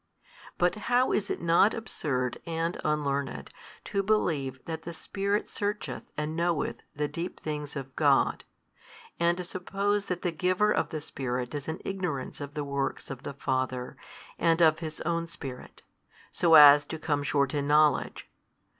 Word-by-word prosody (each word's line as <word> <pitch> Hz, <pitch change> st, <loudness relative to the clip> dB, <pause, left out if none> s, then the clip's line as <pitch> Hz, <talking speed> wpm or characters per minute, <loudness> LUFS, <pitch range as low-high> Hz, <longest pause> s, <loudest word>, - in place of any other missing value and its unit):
But 175 Hz, 0 st, +3 dB, 0.2 s
how 250 Hz, +1 st, +4 dB
is 205 Hz, -, 0 dB
it -, -, -3 dB
not 170 Hz, +5 st, +4 dB
absurd 130 Hz, -, -3 dB
and 165 Hz, +1 st, -1 dB
unlearned 140 Hz, -, -1 dB, 0.3 s
to 200 Hz, -, -1 dB
believe 155 Hz, -11 st, 0 dB
that 160 Hz, -1 st, -4 dB
the 170 Hz, +1 st, -7 dB
Spirit 200 Hz, +4 st, -2 dB
searcheth 205 Hz, +1 st, -3 dB, 0.2 s
and 150 Hz, +1 st, -2 dB
knoweth 170 Hz, -2 st, -1 dB
the 150 Hz, 0 st, -1 dB
deep 170 Hz, +4 st, -5 dB
things 150 Hz, -1 st, -5 dB
of 135 Hz, -2 st, -6 dB
God, -, -, +3 dB, 0.8 s
and 170 Hz, +1 st, +3 dB
to 180 Hz, -, -3 dB
suppose 195 Hz, +3 st, -1 dB
that 180 Hz, -1 st, -3 dB
the 175 Hz, -, +1 dB
Giver 185 Hz, +5 st, +2 dB
of -, -, +1 dB
the 155 Hz, -2 st, -4 dB
Spirit 125 Hz, -4 st, -4 dB
is 145 Hz, -2 st, -5 dB
in 160 Hz, +2 st, -3 dB
ignorance 180 Hz, -11 st, -3 dB
of 145 Hz, +1 st, -7 dB
the 150 Hz, -, -2 dB
works 140 Hz, -1 st, -3 dB
of 135 Hz, -2 st, -7 dB
the 140 Hz, -, -6 dB
Father 130 Hz, -2 st, -2 dB, 0.4 s
and 165 Hz, 0 st, +3 dB
of 160 Hz, -2 st, +5 dB
His 160 Hz, -2 st, -6 dB
own 170 Hz, +1 st, -1 dB
Spirit, 135 Hz, -6 st, -9 dB, 0.5 s
so 165 Hz, -2 st, +4 dB
as 145 Hz, -1 st, +10 dB
to 160 Hz, -, -5 dB
come 150 Hz, -2 st, -1 dB
short 140 Hz, -2 st, +1 dB
in 145 Hz, -1 st, -1 dB
knowledge? 150 Hz, 0 st, +3 dB
155 Hz, 165 wpm, -28 LUFS, 140-175 Hz, 0.8 s, as